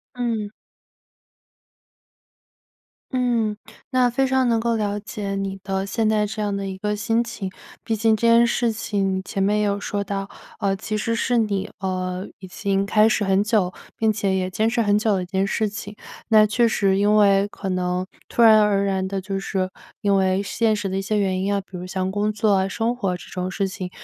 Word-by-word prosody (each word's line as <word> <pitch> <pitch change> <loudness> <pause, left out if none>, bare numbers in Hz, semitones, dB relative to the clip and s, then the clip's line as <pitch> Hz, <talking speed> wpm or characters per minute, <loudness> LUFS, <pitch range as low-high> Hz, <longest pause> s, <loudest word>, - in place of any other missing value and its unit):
嗯。 230 -4 -2 2.6
嗯， 235 -4 +1 0.3
那 250 -1 +3
非 270 +3 +1
常 260 -1 +2
能 230 - +3
够 230 +1 0
了 205 -1 -1
解 205 -1 -5
你 195 0 -4
的 195 0 -2
现 220 +2 0
在 215 -1 +2
这 215 +1 -4
样 205 -1 -1
的 195 0 -3
一 190 -1 -5
个 210 +1 -1
心 225 +3 +1
情， 225 -5 -5 0.3
毕 225 - 0
竟 220 0 +3
这 230 - 0
件 230 +1 +6
事 235 -1 +1
情 195 -3 -1
你 190 - -4
前 195 - -4
面 210 +2 +2
也 - - +2
有 200 0 0
说 205 0 -3
到， 195 0 -4 0.3
呃， 195 -1 +1
其 215 +2 -4
实 230 +2 -1
是 245 +1 +1
你， 205 -3 -1
呃， 185 0 -3
已 185 - -9
经 195 +1 -1
开 215 +2 +4
始 220 - +1
很 195 +1 +2
久， 205 -5 +1 0.2
并 220 -1 +2
且 200 -2 0
也 185 0 -1
坚 215 +4 +1
持 230 0 +1
很 205 0 +3
久 215 -1 +1
的 185 - -1
一 - - -6
件 190 +1 0
事 215 +1 0
情。 205 0 -7 0.3
那 215 -2 +6
确 235 +3 +2
实 195 -3 +2
因 205 +1 +3
为 200 -1 +5
可 200 - -6
能 180 0 -1 0.2
突 235 - +1
然 220 -2 +8
而 200 -1 +2
然 190 -1 0
的 195 0 -3
就 195 +1 -3
是 190 -1 -2 0.3
因 200 -1 +2
为 190 0 +2
现 220 +2 +1
实 205 -2 -2
的 190 - -3
一 195 - -1
些 210 +2 0
原 190 -2 0
因 200 +1 0
啊， 200 - +1
比 190 -1 -11
如 180 - -6
像 185 0 -2
工 205 +2 0
作、 200 -3 +2
生 230 +4 -1
活 195 -7 -1
这 175 - -12
种 180 0 -3
事 195 0 -1
情， 185 -1 -6
205 Hz, 230 characters per minute, -22 LUFS, 195-220 Hz, 2.6 s, 然